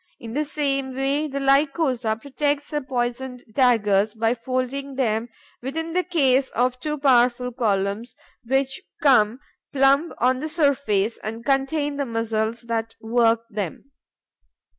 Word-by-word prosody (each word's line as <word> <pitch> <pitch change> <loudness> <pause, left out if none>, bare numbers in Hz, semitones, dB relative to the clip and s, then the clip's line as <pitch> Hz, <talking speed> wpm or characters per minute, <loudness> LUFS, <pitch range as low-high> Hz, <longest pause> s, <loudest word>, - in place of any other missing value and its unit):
In 230 -1 -8
the 300 +3 0
same 275 -3 -2
way, 275 +3 0
the 280 -1 -4
Lycosa 275 -4 +2
protects 285 +2 -2
her 295 -1 -1
poisoned 250 -1 -3
daggers 215 -4 +3
by 225 +1 +1
folding 255 +3 -3
them 230 -3 0 0.3
within 320 +6 -4
the 365 +1 +2
case 275 -7 +2
of 250 +1 +1
two 300 +3 -3
powerful 250 -2 +3
columns, 210 -1 -1 0.3
which 270 +2 0 0.2
come 245 -4 +4 0.3
plumb 275 +4 +3
on 255 +1 +2
the 310 +3 -4
surface 275 - +1
and 225 +2 -6
contain 285 +2 0
the 280 - -1
muscles 225 0 -2
that 225 -1 -3
work 230 0 +2
them. 205 - -5
255 Hz, 135 wpm, -23 LUFS, 230-280 Hz, 0.3 s, come